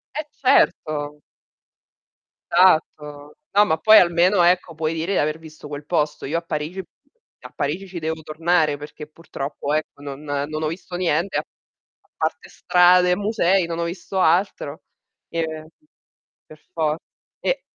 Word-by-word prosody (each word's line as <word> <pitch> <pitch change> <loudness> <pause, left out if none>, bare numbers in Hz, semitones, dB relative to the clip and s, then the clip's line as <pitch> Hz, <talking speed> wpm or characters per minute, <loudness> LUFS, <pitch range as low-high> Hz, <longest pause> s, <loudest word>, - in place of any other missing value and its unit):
Eh, 305 - -2
certo. 150 - +1 1.3
Esatto, 150 -4 +2 0.2
No, 205 +1 +5
ma 160 -6 +1
poi 215 +7 +7
almeno, 175 +2 +3
ecco, 175 0 +2
puoi 155 0 -1
dire 165 +4 -2
di - - +1
aver 150 +1 0
visto 155 -2 -12
quel 145 0 -7
posto. 150 -2 -1
Io 155 +5 -1
a - - -2
Parigi 160 +2 -4 0.6
a - - -11
Parigi 160 +7 -3
ci 180 -2 -7
devo 160 0 -3
tornare, 160 0 +1
perché 150 +1 -10
purtroppo, 150 -2 -5
ecco, 155 -1 -3
non 140 0 -7
non 150 +1 -3
ho 155 - +1
visto 175 +2 -6
niente, 175 +1 0
a - - +1
a - - -36 0.2
parte - - -10
strade 180 0 +4
e - - +3
musei, 195 -3 +1
non 165 0 -4
ho - - 0
visto 180 +2 -4
altro 170 -4 +1 0.5
e 160 -1 -4 0.8
per 155 - -15
for 155 -2 0 0.4
e - - -1
160 Hz, 150 wpm, -22 LUFS, 150-180 Hz, 1.3 s, poi